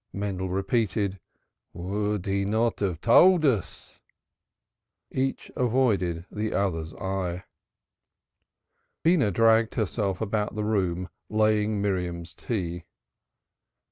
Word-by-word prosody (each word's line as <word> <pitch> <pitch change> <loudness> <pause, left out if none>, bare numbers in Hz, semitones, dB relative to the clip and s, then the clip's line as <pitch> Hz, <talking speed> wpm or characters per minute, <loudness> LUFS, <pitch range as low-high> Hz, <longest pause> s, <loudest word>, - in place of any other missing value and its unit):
Mendel 95 -2 -3
repeated: 100 0 0 0.5
"Would 105 +2 -2
he 100 0 0
not 110 +3 0
have 90 -5 -2
told 170 +7 +6
us?" 115 - -2 1.1
Each 135 +1 -2
avoided 110 -9 +1
the 110 +1 -2
others 80 -5 -1
eye. 95 -2 -3 1.6
Beenah 160 - +4
dragged 115 +3 +3
herself 100 -3 -1
about 105 -1 -1
the 105 - -2
room, 95 -4 0 0.2
laying 110 -1 +2
Miriam's 90 -4 -2
tea. 90 -4 -4
100 Hz, 95 wpm, -26 LUFS, 90-110 Hz, 1.6 s, told